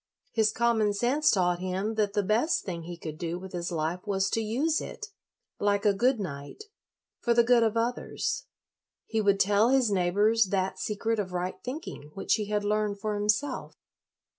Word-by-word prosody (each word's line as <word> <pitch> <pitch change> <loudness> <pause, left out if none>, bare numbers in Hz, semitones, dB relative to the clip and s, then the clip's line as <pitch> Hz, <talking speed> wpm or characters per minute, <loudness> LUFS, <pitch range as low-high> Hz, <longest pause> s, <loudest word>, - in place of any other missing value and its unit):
His 220 -2 +2
common 225 -3 +2
sense 250 +9 +2
taught 180 -3 +2
him 185 +4 -2
that 210 -2 0
the 205 -1 +1
best 225 - +1
thing 170 -3 -5
he 175 0 -7
could 155 -2 -7
do 170 0 -3
with 190 +1 -9
his 175 0 -3
life 165 +2 -1
was 195 -1 0
to 225 - +1
use 270 +9 0
it, 430 - -7 0.5
like 205 0 +1
a 205 - +5
good 245 +5 +2
knight, 145 - -6 0.6
for 235 -1 +1
the 235 - +6
good 240 0 +4
of 225 0 +1
others; 245 - -2 0.6
he 220 -1 -1
would 200 -1 +3
tell 205 +4 +4
his 260 -4 +3
neighbors 205 +4 +3
that 190 -1 -1
secret 220 +3 -1
of 185 -3 -3
right 180 +1 -3
thinking 255 - -6
which 195 - 0
he 210 -2 0
had 210 0 0
learned 210 -1 0
for 215 +1 -2
himself. 210 +7 -1
205 Hz, 185 wpm, -28 LUFS, 185-230 Hz, 0.6 s, the